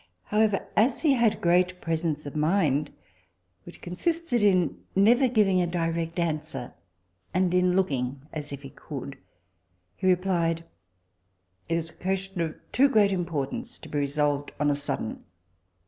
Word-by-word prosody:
However, 210 - +1
as 235 +8 +2
he 300 -4 +5
had 235 -4 +2
great 180 +1 +2
presence 160 -3 -2
of 145 - -7
mind, 150 -3 +2 0.8
which - - -12
consisted 275 - -1
in 185 -4 +3 0.2
never 235 +7 +5
giving 205 -6 +3
a 175 - +1
direct 165 -1 -2
answer, 155 -7 -3 0.6
and 180 -1 +2
in 180 0 +3
looking 135 -7 0
as 150 -2 -5
if 140 0 -7
he 135 - -9
could, 140 -2 -8 0.8
he 185 - -2
replied, 175 -3 +1 1.1
it 165 - +1
was 165 -1 -3
a - - -22
question 190 0 -3
of 160 -2 -2 0.2
too 275 +2 +4
great 210 -5 +4
importance 170 -7 -3
to - - -12
be 145 - -1
resolved 145 0 0
on 145 0 +3
a - - +3
sudden. 145 -6 -3
175 Hz, 145 wpm, -27 LUFS, 150-195 Hz, 1.1 s, he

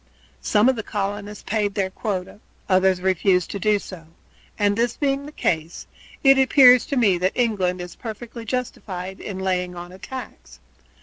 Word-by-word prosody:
Some 210 +3 +3
of 260 - +4
the 225 - -3
colonists 205 0 -4
paid 205 -2 -1
their 190 -2 -1
quota, 195 -1 -4 0.3
others 185 -1 +3
refused 185 -1 +1
to 200 - -4
do 210 +2 +2
so, 180 -5 -10 0.5
and 205 -1 +2
this 235 +2 0
being 280 0 -1
the - - -9
case, 165 - -2 0.4
it 270 -1 +6
appears 255 -2 +6
to 280 - -2
me 200 -7 +3
that 185 +2 +1
England 195 -7 0
is 180 -1 -8
perfectly 230 +1 -8
justified 195 -6 -5
in 195 - -6
laying 180 -1 -1
on 175 0 -8
a 185 - -13
tax. 260 +5 -9
205 Hz, 170 wpm, -22 LUFS, 185-235 Hz, 0.5 s, it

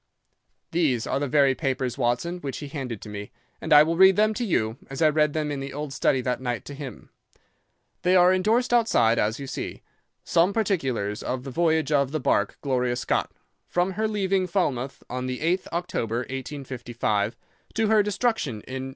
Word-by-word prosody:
"These 145 -9 +1
are - - -1
the 145 - -1
very 140 0 +4
papers, 130 -2 -2
Watson, 130 +8 -1
which 140 -5 -5
he 145 - -7
handed 130 -8 -5
to - - -9
me, 105 0 -7 0.3
and - - -5
I 150 0 +9
will 165 +2 -1
read 190 +1 +7
them 215 +1 +3
to 245 - -3
you, 110 - 0
as 135 - -6
I 155 - +5
read 150 -1 +2
them 150 -1 -1
in 140 - -3
the 135 0 -6
old 145 -1 -5
study 135 -1 +2
that 125 0 -2
night 120 -3 -3
to 145 - -8
him. 140 -2 -9 0.9
They 180 +1 +3
are 180 0 +6
endorsed 220 +7 +2
outside, 120 - +3
as 110 +5 0
you 140 - -5
see, - - -6 0.4
'Some 175 +3 +2
particulars 135 - -1
of 125 0 -3
the 135 - -6
voyage 160 0 +1
of 140 -2 +3
the 155 - 0
bark 100 -6 +1
Gloria 125 -3 0
Scott, 120 - -1 0.4
from 180 +2 0
her 215 +3 -1
leaving 195 -3 0
Falmouth 140 -8 -1
on 125 +1 -4
the 130 0 -3
8th 175 +4 0
October, 120 -9 -2
1855, 125 -5 -3 0.4
to 220 0 +2
her 220 -1 +5
destruction 205 - -1
in 130 +2 -6
N. - - -7
140 Hz, 195 wpm, -25 LUFS, 125-180 Hz, 0.9 s, I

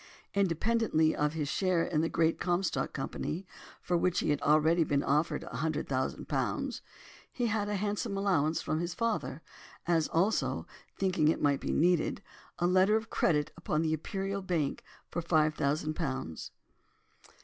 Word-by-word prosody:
Independently 195 -3 +2
of 150 0 0
his 155 -3 -2
share 180 +2 +1
in 155 -3 0
the 165 - 0
Great 165 0 +1
Comstock 180 +1 0
Company, 155 +6 -4 0.4
for 175 - 0
which 175 +1 +1
he - - +1
had 145 - 0
already 155 +3 +4
been 145 -2 0
offered 150 +2 +1
a 115 - -7
hundred 155 +3 -1
thousand 130 -1 -2
pounds—he 245 - -4
had 210 -2 0
a 205 - -1
handsome 205 +1 -2
allowance 165 -6 +1
from 155 0 -1
his 175 0 -3
father—as 170 - -2
also, 190 +7 +1 0.3
thinking 180 -5 +2
it 160 - +2
might 140 -2 +2
be - - -2
needed, 175 0 +2 0.3
a 175 - 0
letter 185 +4 +4
of 220 0 -2
credit 150 -3 +1
upon 160 -2 -1
the 160 -1 +1
Imperial 195 +5 -3
Bank 170 -7 -1 0.3
for 175 - -2
five 155 -2 +2
thousand 150 +2 0
pounds. 130 - -4
165 Hz, 155 wpm, -31 LUFS, 155-190 Hz, 0.4 s, already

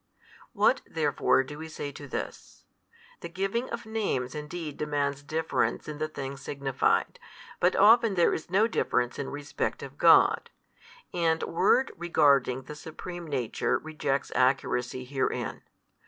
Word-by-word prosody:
What - - +3
therefore 135 - +2
do 145 +3 -9
we 160 - -6
say 145 -2 -6
to 145 +1 -10
this? - - -7 0.5
The - - -7
giving 195 +8 -2
of - - -5
names 205 - -2
|227 - - -10
indeed 150 -1 -6
demands 145 -2 -1
difference 160 +2 -1
in 150 -1 -6
the 155 - -1
things 140 -2 -6
signified, 135 -2 0 0.4
but 180 +1 +3
often 225 +1 +6
there 175 - +4
is 160 - -5
no 195 +4 +4
difference 125 - 0
in 140 - -3
respect 145 0 -3
of - - -10
God, - - +5 0.6
and 165 -2 +1
word 255 +9 +2
regarding 140 -6 +2
the 150 - -8
supreme 170 +3 -8
Nature 130 -6 0
rejects 150 -3 -2
accuracy 130 -1 +1
herein. 130 0 -2
150 Hz, 140 wpm, -28 LUFS, 135-175 Hz, 0.6 s, often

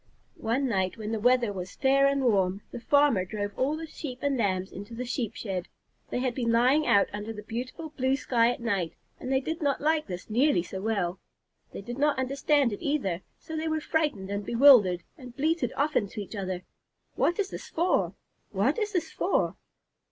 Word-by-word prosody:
One 250 +5 0
night, 190 -4 0
when 215 -1 -5
the 225 - -1
weather 245 -1 +3
was 185 -1 -6
fair 275 0 +4
and 275 -1 +1
warm, 195 -4 +2
the - - -6
farmer 280 -4 +3
drove 205 +1 -4
all 285 +4 0
the 325 - -5
Sheep 290 -5 -7
and 285 -1 +1
Lambs 190 -5 0
into 205 +4 -8
the 250 +2 -4
Sheep 240 -3 -3
shed. 185 -5 -4 0.4
They - - -2
had 250 0 0
been 235 -2 0
lying 255 +6 +4
out 200 -1 +5
under 210 +2 -4
the 210 -1 -8
beautiful 255 +8 -5
blue 265 -2 +1
sky 240 -4 +2
at - - -5
night, 195 -8 -1 0.3
and 255 - -5
they 265 - +3
did 320 +5 -4
not 285 -2 +1
like 310 +1 +1
this 180 -2 -6
nearly 230 - +3
so 190 +1 -6
well. 195 -4 -1 0.5
They - - -7
did 240 +5 -7
not 295 0 +2
understand 275 -1 +2
it - - -7
either, 200 - -1 0.2
so 320 - -8
they 315 +1 -2
were 315 0 0
frightened 295 -12 -1
and 200 0 -2
bewildered, 230 -7 +6 0.2
and 250 -2 -11
bleated 300 -4 +1
often 285 -7 +1
to 205 - -8
each 205 +2 -6
other, 185 -2 -3 0.5
"What 345 - +1
is 390 -2 -1
this - - -7
for? 345 +3 +1 0.3
What - - +1
is 425 -1 -2
this 340 -3 -1
for?" - - 0
245 Hz, 205 wpm, -28 LUFS, 200-285 Hz, 0.5 s, bewildered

